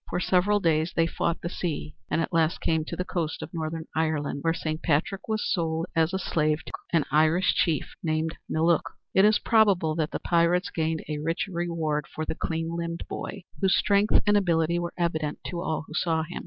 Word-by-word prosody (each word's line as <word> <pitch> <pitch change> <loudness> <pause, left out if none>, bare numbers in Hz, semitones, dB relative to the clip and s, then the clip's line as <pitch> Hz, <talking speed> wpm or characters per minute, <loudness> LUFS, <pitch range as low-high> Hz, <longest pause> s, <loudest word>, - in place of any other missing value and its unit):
For - - -1
several 195 +3 +3
days 160 -2 +1
they 165 - +3
fought 170 0 -1
the - - -3
sea 165 -4 -3 0.2
and 165 - +1
at 165 - -3
last 165 0 +2
came 160 -1 +1
to - - -5
the 180 - -3
coast 165 -4 -3
of - - -9
northern 160 -1 -3
Ireland, 155 -3 0
where 165 - +2
Saint 160 -1 -3
Patrick 180 +5 0
was 220 -1 -1
sold 165 -2 -1
as 165 0 +3
a 190 - 0
slave 155 -4 0
to - - -8 0.2
an 165 -4 +3
Irish 160 +5 +4
chief 160 -5 0
named 160 0 -1 0.2
Miliuc. 165 0 +3 0.3
It 190 - +6
is 215 0 +5
probable 200 -8 +3
that 155 -1 0
the - - -4
pirates 175 +2 +2
gained 160 -1 -1
a 150 -1 -3
rich 165 +3 -1
reward 165 -5 -2
for 155 - -5
the - - -2
clean 165 +1 -3
limbed 170 0 -3
boy, 195 -2 -6 0.2
whose 190 -1 +3
strength 205 +1 +4
and 205 -1 +4
ability 170 -3 +2
were 175 0 -4
evident 160 -3 -1
to 170 -1 -3
all 160 -3 -2
who 155 - -11
saw 160 -1 +1
him. 175 +2 -6
165 Hz, 210 wpm, -27 LUFS, 160-180 Hz, 0.3 s, It